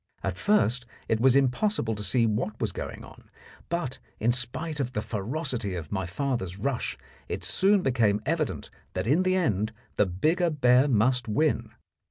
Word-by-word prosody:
At 95 Hz, -2 st, -1 dB
first 125 Hz, -, +2 dB, 0.2 s
it 110 Hz, -, +1 dB
was 130 Hz, +2 st, +5 dB
impossible 135 Hz, -, +2 dB
to 105 Hz, -, -5 dB
see 110 Hz, +4 st, +2 dB
what 110 Hz, 0 st, -1 dB
was 110 Hz, -4 st, -1 dB
going -, -, -6 dB
on, -, -, -15 dB, 0.4 s
but, 170 Hz, -7 st, -2 dB, 0.2 s
in 115 Hz, +3 st, +3 dB
spite 150 Hz, +6 st, -2 dB
of 130 Hz, -2 st, -2 dB
the 105 Hz, -, -1 dB
ferocity 115 Hz, -, -2 dB
of 80 Hz, -4 st, -6 dB
my 95 Hz, -3 st, -2 dB
father's 95 Hz, -3 st, -2 dB
rush, 125 Hz, +4 st, -2 dB, 0.3 s
it -, -, -3 dB
soon 195 Hz, 0 st, +3 dB
became 115 Hz, -6 st, +2 dB
evident 155 Hz, -1 st, -2 dB, 0.2 s
that 90 Hz, +1 st, -2 dB
in 145 Hz, +10 st, +3 dB
the 185 Hz, 0 st, +2 dB
end 110 Hz, -, 0 dB, 0.2 s
the 105 Hz, -, +4 dB
bigger 160 Hz, -, +1 dB
bear 130 Hz, -3 st, +4 dB
must 125 Hz, 0 st, +2 dB
win. 150 Hz, +8 st, 0 dB
125 Hz, 170 wpm, -27 LUFS, 105-150 Hz, 0.4 s, was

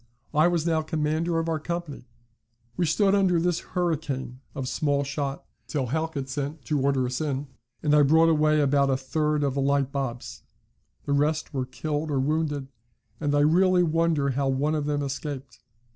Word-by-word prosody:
I 155 Hz, +3 st, +5 dB
was 170 Hz, -2 st, 0 dB
now 160 Hz, -2 st, +2 dB
commander 155 Hz, +1 st, -1 dB
of 165 Hz, 0 st, -1 dB
our 160 Hz, -1 st, 0 dB
company. 165 Hz, -5 st, -5 dB, 0.7 s
We 175 Hz, -2 st, +1 dB
stood 195 Hz, +5 st, +3 dB
under 190 Hz, -4 st, +3 dB
this 175 Hz, 0 st, +1 dB
hurricane 155 Hz, -8 st, -3 dB, 0.2 s
of 135 Hz, -2 st, -3 dB
small 145 Hz, 0 st, 0 dB
shot 140 Hz, 0 st, -4 dB, 0.2 s
till 140 Hz, -4 st, -1 dB
Halkett 160 Hz, -1 st, -2 dB
sent 140 Hz, +1 st, -4 dB
to 150 Hz, +4 st, 0 dB
order 135 Hz, -1 st, +2 dB
us 125 Hz, +4 st, -3 dB
in, 145 Hz, -2 st, -2 dB, 0.3 s
and 150 Hz, -1 st, +2 dB
I 150 Hz, -, +6 dB
brought 160 Hz, +3 st, +5 dB
away 155 Hz, -1 st, +3 dB
about 140 Hz, -1 st, +3 dB
a 135 Hz, -, +2 dB
third 150 Hz, +2 st, 0 dB
of 140 Hz, -2 st, 0 dB
the 140 Hz, -, -1 dB
light 140 Hz, 0 st, +1 dB
bobs; 120 Hz, -, -4 dB, 0.6 s
the 140 Hz, -, 0 dB
rest 150 Hz, +2 st, 0 dB
were 130 Hz, -2 st, -2 dB
killed 150 Hz, +4 st, -3 dB
or 140 Hz, -2 st, 0 dB
wounded, 145 Hz, -1 st, -1 dB, 0.5 s
and 145 Hz, -2 st, 0 dB
I 145 Hz, -, +4 dB
really 180 Hz, +4 st, +4 dB
wonder 160 Hz, -4 st, +1 dB
how 135 Hz, +1 st, 0 dB
one 135 Hz, +3 st, +1 dB
of 150 Hz, -2 st, -1 dB
them 145 Hz, -1 st, 0 dB
escaped. 135 Hz, -3 st, -5 dB
150 Hz, 180 wpm, -26 LUFS, 140-160 Hz, 0.7 s, I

